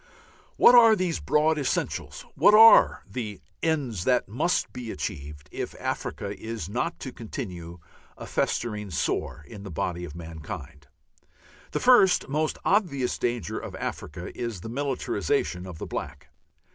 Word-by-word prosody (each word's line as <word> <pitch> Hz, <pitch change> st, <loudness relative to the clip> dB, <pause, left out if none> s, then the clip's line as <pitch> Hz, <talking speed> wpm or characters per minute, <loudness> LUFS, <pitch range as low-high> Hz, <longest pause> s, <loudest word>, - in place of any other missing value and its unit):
What -, -, +8 dB
are 230 Hz, -2 st, +8 dB
these 180 Hz, -4 st, -1 dB
broad 155 Hz, +1 st, +2 dB
essentials? 140 Hz, -, -3 dB
What 210 Hz, -, +5 dB
are 225 Hz, +1 st, +8 dB
the 105 Hz, -2 st, -5 dB, 0.2 s
ends 140 Hz, -, -1 dB
that 125 Hz, -1 st, +2 dB
must 150 Hz, -, 0 dB
be 125 Hz, -2 st, -6 dB
achieved 75 Hz, -2 st, -6 dB
if -, -, -6 dB
Africa 100 Hz, 0 st, -4 dB
is 110 Hz, -7 st, -5 dB
not 125 Hz, -, -2 dB
to 130 Hz, -, -5 dB
continue 90 Hz, -7 st, -7 dB, 0.4 s
a -, -, -8 dB
festering 105 Hz, -3 st, -2 dB
sore 75 Hz, -2 st, -2 dB
in 105 Hz, -3 st, -10 dB
the 100 Hz, -, -8 dB
body 90 Hz, +1 st, -3 dB
of 80 Hz, -3 st, -8 dB
mankind? 80 Hz, -3 st, -9 dB, 0.8 s
The -, -, -2 dB
first 240 Hz, -8 st, +5 dB
most 155 Hz, +2 st, -1 dB
obvious 155 Hz, -, +1 dB
danger 120 Hz, -2 st, -2 dB
of -, -, -8 dB
Africa -, -, -6 dB
is 115 Hz, -7 st, -4 dB
the 115 Hz, -, -7 dB
militarization 125 Hz, -8 st, -1 dB
of 90 Hz, -3 st, -8 dB
the -, -, -6 dB
black. 70 Hz, 0 st, -6 dB
115 Hz, 145 wpm, -26 LUFS, -, 0.8 s, What